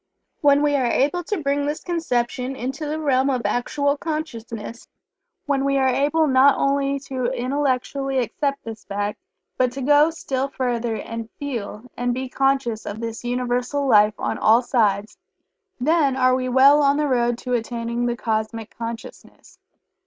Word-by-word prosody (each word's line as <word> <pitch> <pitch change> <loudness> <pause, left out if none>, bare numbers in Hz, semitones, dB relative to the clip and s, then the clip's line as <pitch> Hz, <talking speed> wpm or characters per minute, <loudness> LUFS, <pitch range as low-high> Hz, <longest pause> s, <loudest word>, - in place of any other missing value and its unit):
When 285 0 +4
we 290 -1 +2
are 255 -3 +1
able 290 +9 +1
to 395 -6 -3
bring 285 +1 0
this 295 +1 -3
conception 255 -6 -2
into 265 +5 -4
the 305 +1 -3
realm 270 -3 +2
of 255 -3 -1
actual 285 +6 0
consciousness 235 -8 -6 0.6
when 275 -2 0
we 275 0 +1
are 265 -1 +3
able 295 +5 +2
not 270 0 +5
only 275 0 +1
to 260 -2 -4
intellectually 265 +1 -1
accept 275 +4 -1
this 225 -1 -8
fact, 205 +1 -3 0.4
but 255 -1 +2
to 270 - -5
even - - -3
go 295 +2 +6
still 275 -4 -3
further 240 -4 -2
and 230 0 -6
feel 235 -6 -5
and 245 0 -1
be 260 0 -4
conscious 270 -5 0
of 205 +2 -5
this 230 0 -5
Universal 250 +3 -1
Life 210 -3 +5
on - - -3
all 225 +3 +4
sides, 210 -4 0 0.6
then 285 0 +2
are 255 -1 +4
we 255 0 -1
well 275 +4 +6
on 280 0 +3
the 300 0 +1
road 240 -2 +1
to 250 0 -4
attaining 235 0 -2
the 240 0 -2
Cosmic 220 0 -3
Consciousness. 230 -1 -9
255 Hz, 165 wpm, -22 LUFS, 235-280 Hz, 0.6 s, go